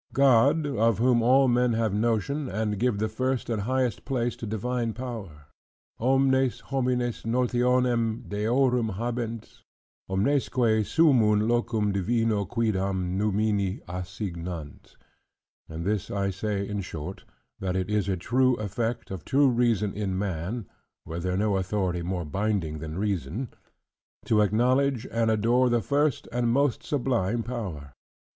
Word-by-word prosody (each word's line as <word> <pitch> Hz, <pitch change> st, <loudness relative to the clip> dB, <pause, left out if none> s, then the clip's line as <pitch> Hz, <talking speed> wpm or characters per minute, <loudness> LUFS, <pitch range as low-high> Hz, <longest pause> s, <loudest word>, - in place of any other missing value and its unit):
"God, 140 Hz, +3 st, +4 dB
of 115 Hz, -6 st, +1 dB
whom 120 Hz, +1 st, +3 dB
all 130 Hz, +3 st, +5 dB
men 120 Hz, -1 st, +3 dB
have 110 Hz, -2 st, 0 dB
notion, 115 Hz, +6 st, 0 dB
and 105 Hz, 0 st, -2 dB
give 120 Hz, -2 st, +1 dB
the 110 Hz, +2 st, 0 dB
first 130 Hz, +3 st, -2 dB
and 110 Hz, -3 st, -1 dB
highest 125 Hz, +1 st, -1 dB
place 120 Hz, -4 st, -1 dB
to 115 Hz, -, -6 dB
divine 115 Hz, +2 st, -2 dB
power": 105 Hz, -, -7 dB, 0.5 s
"Omnes 130 Hz, +1 st, +2 dB
homines 125 Hz, -3 st, -1 dB
notionem 120 Hz, -1 st, +1 dB
deorum 115 Hz, +1 st, +1 dB
habent, 115 Hz, 0 st, -4 dB, 0.5 s
omnesque 110 Hz, +9 st, 0 dB, 0.3 s
summun 110 Hz, -10 st, +4 dB
locum 115 Hz, -3 st, +1 dB
divino 105 Hz, +1 st, +1 dB
cuidam 95 Hz, -4 st, -1 dB
numini 105 Hz, -1 st, 0 dB
assignant." 90 Hz, -4 st, -6 dB, 0.7 s
And 80 Hz, +1 st, -5 dB
this 105 Hz, -1 st, -1 dB
I 100 Hz, -1 st, -1 dB
say 100 Hz, +1 st, -2 dB
in 105 Hz, -1 st, -3 dB
short; 80 Hz, -5 st, -7 dB, 0.4 s
that 95 Hz, -1 st, -2 dB
it 95 Hz, -1 st, -1 dB
is 105 Hz, -2 st, +1 dB
a 95 Hz, -, 0 dB
true 130 Hz, +7 st, +2 dB
effect 110 Hz, +2 st, -3 dB
of 95 Hz, -4 st, -6 dB
true 140 Hz, 0 st, +3 dB
reason 115 Hz, -5 st, +1 dB
in 100 Hz, -3 st, -2 dB
man 95 Hz, +3 st, -3 dB, 0.4 s
(were 80 Hz, +1 st, -5 dB
there 90 Hz, +1 st, -1 dB
no 105 Hz, -1 st, +1 dB
authority 95 Hz, -2 st, -1 dB
more 90 Hz, 0 st, -3 dB
binding 95 Hz, -3 st, -1 dB
than 80 Hz, +1 st, -6 dB
reason) 100 Hz, -, -2 dB, 0.8 s
to 105 Hz, -1 st, +3 dB
acknowledge 125 Hz, +5 st, +2 dB
and 115 Hz, -1 st, +1 dB
adore 120 Hz, +4 st, +3 dB
the 120 Hz, -1 st, +1 dB
first 145 Hz, -1 st, +1 dB
and 120 Hz, -1 st, +1 dB
most 140 Hz, 0 st, +2 dB
sublime 120 Hz, -5 st, 0 dB
power. 95 Hz, -, -6 dB
110 Hz, 135 wpm, -26 LUFS, 100-125 Hz, 0.8 s, all